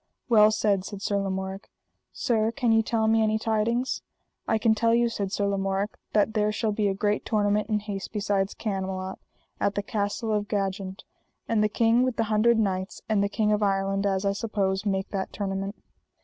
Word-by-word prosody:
Well 215 Hz, -2 st, +7 dB
said, 210 Hz, -3 st, +1 dB
said 200 Hz, 0 st, -7 dB
Sir 200 Hz, -, 0 dB
Lamorak. 190 Hz, 0 st, -3 dB, 0.4 s
Sir, 225 Hz, -2 st, +1 dB
can 240 Hz, -2 st, +1 dB
ye 225 Hz, 0 st, +5 dB
tell 220 Hz, 0 st, 0 dB
me 225 Hz, 0 st, +4 dB
any 215 Hz, 0 st, +2 dB
tidings? 225 Hz, +3 st, 0 dB, 0.5 s
I 220 Hz, -, +2 dB
can 220 Hz, 0 st, +3 dB
tell 230 Hz, +1 st, +2 dB
you, 235 Hz, 0 st, +3 dB
said 200 Hz, -4 st, -3 dB
Sir 205 Hz, -, 0 dB
Lamorak, 195 Hz, +1 st, -1 dB, 0.2 s
that 215 Hz, +1 st, +3 dB
there 210 Hz, -1 st, +2 dB
shall 215 Hz, 0 st, -1 dB
be 205 Hz, 0 st, 0 dB
a 195 Hz, -, 0 dB
great 205 Hz, +1 st, 0 dB
tournament 210 Hz, -1 st, +1 dB
in 210 Hz, -1 st, +1 dB
haste 200 Hz, -2 st, -5 dB
beside 200 Hz, -2 st, -1 dB
Camelot, 190 Hz, -2 st, -3 dB, 0.4 s
at 200 Hz, -, 0 dB
the 205 Hz, -, -1 dB
Castle 210 Hz, +1 st, -2 dB
of 205 Hz, -1 st, 0 dB
Jagent; 195 Hz, -1 st, -3 dB, 0.4 s
and 220 Hz, -2 st, +2 dB
the 210 Hz, -, +2 dB
King 230 Hz, +3 st, +3 dB
with 255 Hz, -1 st, +1 dB
the 225 Hz, -, +1 dB
Hundred 230 Hz, +2 st, +4 dB
Knights 190 Hz, -3 st, -1 dB
and 215 Hz, -2 st, +2 dB
the 200 Hz, -, 0 dB
King 210 Hz, 0 st, +1 dB
of 210 Hz, 0 st, +1 dB
Ireland, 195 Hz, 0 st, +1 dB
as 195 Hz, 0 st, 0 dB
I 200 Hz, -, +3 dB
suppose, 200 Hz, -2 st, -1 dB
make 195 Hz, 0 st, -1 dB
that 195 Hz, -2 st, -3 dB
tournament. 195 Hz, 0 st, -3 dB
205 Hz, 195 wpm, -26 LUFS, 195-220 Hz, 0.5 s, Well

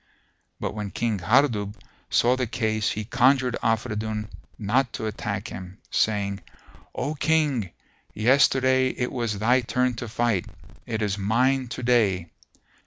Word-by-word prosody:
But -, -, -3 dB
when 105 Hz, -1 st, -4 dB
King 110 Hz, -1 st, -1 dB
Hardub 105 Hz, 0 st, +2 dB, 0.3 s
saw 125 Hz, +2 st, +3 dB
the 130 Hz, -2 st, -1 dB
case 110 Hz, -2 st, 0 dB
he 110 Hz, 0 st, -3 dB
conjured 125 Hz, +1 st, +3 dB
Afridun 110 Hz, -2 st, -1 dB, 0.3 s
not 120 Hz, +4 st, +1 dB
to -, -, -4 dB
attack 105 Hz, -2 st, -4 dB
him, 95 Hz, +1 st, -8 dB
saying, 100 Hz, -2 st, 0 dB, 0.6 s
"O 145 Hz, -, -2 dB
King, 145 Hz, -, +1 dB, 0.5 s
yesterday 130 Hz, +2 st, +4 dB
it 125 Hz, -1 st, -3 dB
was 115 Hz, -5 st, -2 dB
thy 120 Hz, +5 st, +3 dB
turn 125 Hz, +1 st, 0 dB
to 120 Hz, -, -5 dB
fight: 110 Hz, -4 st, 0 dB, 0.4 s
it 110 Hz, -2 st, -2 dB
is 100 Hz, -1 st, -1 dB
mine 125 Hz, +6 st, +2 dB
to 125 Hz, -, -6 dB
day. 100 Hz, -8 st, +2 dB
115 Hz, 135 wpm, -25 LUFS, 105-130 Hz, 0.6 s, yesterday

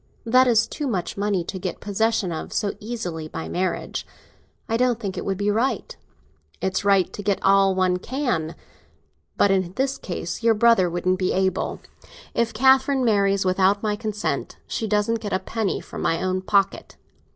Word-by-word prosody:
That 255 Hz, +3 st, +5 dB
is 225 Hz, -2 st, +4 dB
too 295 Hz, +3 st, -4 dB
much 190 Hz, -8 st, -2 dB
money 200 Hz, -3 st, 0 dB
to 190 Hz, +3 st, -6 dB
get 185 Hz, -1 st, -4 dB
possession 210 Hz, -2 st, 0 dB
of 160 Hz, -, -5 dB
so 205 Hz, -, -1 dB
easily, 195 Hz, -9 st, -5 dB
by 160 Hz, -, -6 dB
marrying. 185 Hz, +1 st, -2 dB, 0.7 s
I 225 Hz, -, 0 dB
don't 245 Hz, -1 st, +2 dB
think 200 Hz, -5 st, -4 dB
it -, -, -4 dB
would 195 Hz, -1 st, -2 dB
be 205 Hz, +1 st, +1 dB
right." 235 Hz, +6 st, -1 dB, 0.6 s
"It's 190 Hz, +1 st, -1 dB
right 195 Hz, -3 st, +3 dB
to -, -, -6 dB
get 200 Hz, -1 st, +1 dB
all 195 Hz, -1 st, +4 dB
one 185 Hz, -1 st, +2 dB
can. 205 Hz, -, -2 dB, 0.8 s
But 200 Hz, -, +4 dB
in 185 Hz, -2 st, 0 dB
this 270 Hz, +1 st, -1 dB
case 175 Hz, 0 st, -5 dB
your 230 Hz, -1 st, +4 dB
brother 220 Hz, -5 st, +4 dB
wouldn't 185 Hz, +2 st, 0 dB
be 185 Hz, -, +1 dB
able. 190 Hz, -1 st, -1 dB, 0.5 s
If 235 Hz, -1 st, +1 dB
Catherine 265 Hz, +2 st, +3 dB
marries 200 Hz, -3 st, +2 dB
without 190 Hz, +2 st, +2 dB
my 210 Hz, -1 st, 0 dB
consent, 210 Hz, -1 st, -3 dB
she 225 Hz, -, -3 dB
doesn't 210 Hz, +2 st, +1 dB
get 205 Hz, -, -4 dB
a 185 Hz, -, +2 dB
penny 220 Hz, -2 st, -2 dB
from -, -, -8 dB
my 165 Hz, -, +1 dB
own 185 Hz, 0 st, -1 dB
pocket." 195 Hz, 0 st, 0 dB
200 Hz, 175 wpm, -23 LUFS, 185-225 Hz, 0.8 s, That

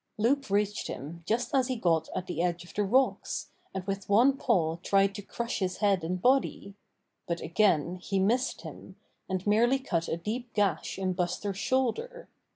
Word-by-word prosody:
Loup 265 Hz, +4 st, +1 dB
reached 205 Hz, +1 st, 0 dB
him 165 Hz, +6 st, -7 dB
just 240 Hz, +6 st, 0 dB
as 260 Hz, -2 st, +3 dB
he 260 Hz, -, -1 dB
got 170 Hz, -8 st, +1 dB
at 185 Hz, -, -2 dB
the 170 Hz, -2 st, -3 dB
edge 175 Hz, -1 st, -1 dB
of -, -, -14 dB
the 210 Hz, -, +1 dB
rocks, 255 Hz, +7 st, +1 dB, 0.2 s
and 190 Hz, -1 st, -4 dB
with 195 Hz, 0 st, -4 dB
one 245 Hz, +7 st, +5 dB
paw 170 Hz, -12 st, +1 dB
tried 195 Hz, +2 st, +2 dB
to 205 Hz, -, -6 dB
crush 235 Hz, +5 st, -4 dB
his 185 Hz, -2 st, -1 dB
head 200 Hz, -4 st, +2 dB
and 180 Hz, +3 st, -2 dB
body; 250 Hz, -3 st, +1 dB, 0.5 s
but 170 Hz, 0 st, -1 dB
again 170 Hz, -1 st, +2 dB
he 195 Hz, +2 st, -3 dB
missed 235 Hz, +7 st, +1 dB
him, -, -, -10 dB, 0.3 s
and 185 Hz, 0 st, -2 dB
merely 235 Hz, +5 st, +4 dB
cut 175 Hz, -11 st, -2 dB
a 165 Hz, -, -1 dB
deep 230 Hz, +7 st, -5 dB
gash 205 Hz, -3 st, 0 dB
in 190 Hz, -1 st, -1 dB
Buster's 185 Hz, +2 st, -2 dB
shoulder. 265 Hz, -, -1 dB
200 Hz, 180 wpm, -29 LUFS, 180-240 Hz, 0.5 s, one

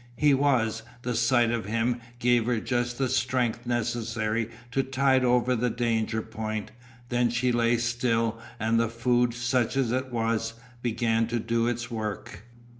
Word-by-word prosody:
He 145 Hz, +1 st, +4 dB
was. 125 Hz, -5 st, +2 dB, 0.2 s
The 125 Hz, -, -1 dB
sight 120 Hz, 0 st, +3 dB
of 115 Hz, -3 st, -2 dB
him 115 Hz, +3 st, 0 dB, 0.2 s
gave 120 Hz, -1 st, +2 dB
her 120 Hz, -2 st, +1 dB
just 120 Hz, 0 st, -1 dB
the 135 Hz, -, +1 dB
strength 125 Hz, -2 st, 0 dB
necessary 115 Hz, -2 st, -1 dB, 0.2 s
to 135 Hz, -, +2 dB
tide 135 Hz, 0 st, +2 dB
over 125 Hz, 0 st, +3 dB
the 125 Hz, +1 st, +1 dB
danger 115 Hz, -2 st, 0 dB
point; 110 Hz, -1 st, -5 dB, 0.4 s
then 120 Hz, -1 st, +2 dB
she 125 Hz, +2 st, +1 dB
lay 120 Hz, 0 st, +2 dB
still 115 Hz, -1 st, 0 dB, 0.2 s
and 115 Hz, +1 st, +2 dB
the 115 Hz, -1 st, +1 dB
food, 120 Hz, +1 st, +1 dB
such 125 Hz, +1 st, 0 dB
as 130 Hz, -4 st, +1 dB
it 130 Hz, +1 st, -1 dB
was, 115 Hz, -1 st, -1 dB, 0.3 s
began 115 Hz, -1 st, +1 dB
to 120 Hz, +1 st, -1 dB
do 115 Hz, +1 st, 0 dB
its 120 Hz, 0 st, -3 dB
work. 105 Hz, -3 st, -5 dB
120 Hz, 160 wpm, -27 LUFS, 115-125 Hz, 0.4 s, He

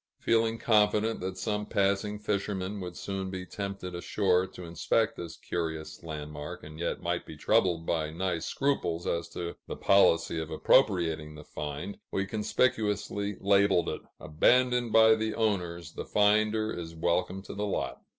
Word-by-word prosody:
Feeling 115 Hz, 0 st, +2 dB
confident 105 Hz, 0 st, +2 dB
that 95 Hz, 0 st, -4 dB
some 105 Hz, +2 st, -2 dB
passing 100 Hz, +1 st, +1 dB
fisherman 100 Hz, -1 st, -2 dB
would 90 Hz, -1 st, -6 dB
soon 95 Hz, -1 st, -4 dB
be 95 Hz, -1 st, -5 dB
tempted 100 Hz, -2 st, -5 dB
ashore 90 Hz, +1 st, +1 dB
to 90 Hz, -, -11 dB
inspect 85 Hz, +6 st, 0 dB
this 85 Hz, -1 st, -7 dB
curious 80 Hz, -2 st, -4 dB
landmark, 75 Hz, -2 st, -7 dB
and 75 Hz, +1 st, -10 dB
yet 85 Hz, -, -2 dB
might -, -, -1 dB
be -, -, -11 dB
troubled 85 Hz, -3 st, +2 dB
by 80 Hz, -2 st, 0 dB
nice 85 Hz, +1 st, -2 dB
scruples 110 Hz, -12 st, -1 dB
as 85 Hz, 0 st, -1 dB
to 85 Hz, -1 st, -5 dB
the -, -, -4 dB
policy 85 Hz, -4 st, +4 dB
of 80 Hz, -1 st, -4 dB
appropriating 80 Hz, -, +2 dB
the 75 Hz, -, -10 dB
find, 75 Hz, +7 st, -6 dB
we 95 Hz, -, 0 dB
conspicuously 105 Hz, -2 st, 0 dB
labeled 100 Hz, -3 st, +3 dB
it: -, -, -4 dB, 0.2 s
"Abandoned 125 Hz, +8 st, +3 dB
by 110 Hz, 0 st, +7 dB
the 110 Hz, 0 st, -1 dB
owners! 90 Hz, -7 st, -1 dB
The -, -, -5 dB
finder 110 Hz, +1 st, +2 dB
is 85 Hz, -1 st, -6 dB
welcome 90 Hz, +3 st, 0 dB
to -, -, -8 dB
the 105 Hz, +1 st, -2 dB
lot." 60 Hz, -10 st, -3 dB
95 Hz, 155 wpm, -29 LUFS, 85-105 Hz, 0.2 s, by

